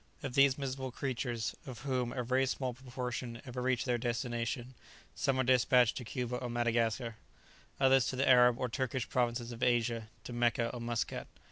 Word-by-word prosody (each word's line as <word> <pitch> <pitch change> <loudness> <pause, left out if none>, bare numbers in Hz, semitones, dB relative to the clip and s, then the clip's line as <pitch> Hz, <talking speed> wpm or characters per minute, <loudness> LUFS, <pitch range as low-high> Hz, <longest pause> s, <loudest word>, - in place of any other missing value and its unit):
Of 135 - -4
these 140 -1 +5
miserable 135 -1 -3
creatures, 120 -3 -2
of 120 -3 -7
whom 130 -3 -1
a 125 0 -2
very 130 +2 +2
small 130 -1 -2
proportion 125 -1 -5
ever 125 -1 -5
reach 125 -2 +1
their 120 -2 +1
destination, 120 +2 -2 0.4
some 135 -1 0
are - - +4
despatched 125 -1 +4
to 125 - -4
Cuba 125 +1 -3
or 125 - -4
Madagascar, 115 -1 0 0.6
others 135 -2 +5
to - - -2
the 135 +2 +1
Arab 125 -2 +6
or 125 - -1
Turkish 130 0 -2
provinces 120 -1 0
of 120 0 -8
Asia, 115 -2 +1
to 120 - -7
Mecca 120 0 +1
or 120 - -5
Muscat. 120 -1 -2
125 Hz, 175 wpm, -33 LUFS, 120-130 Hz, 0.6 s, Arab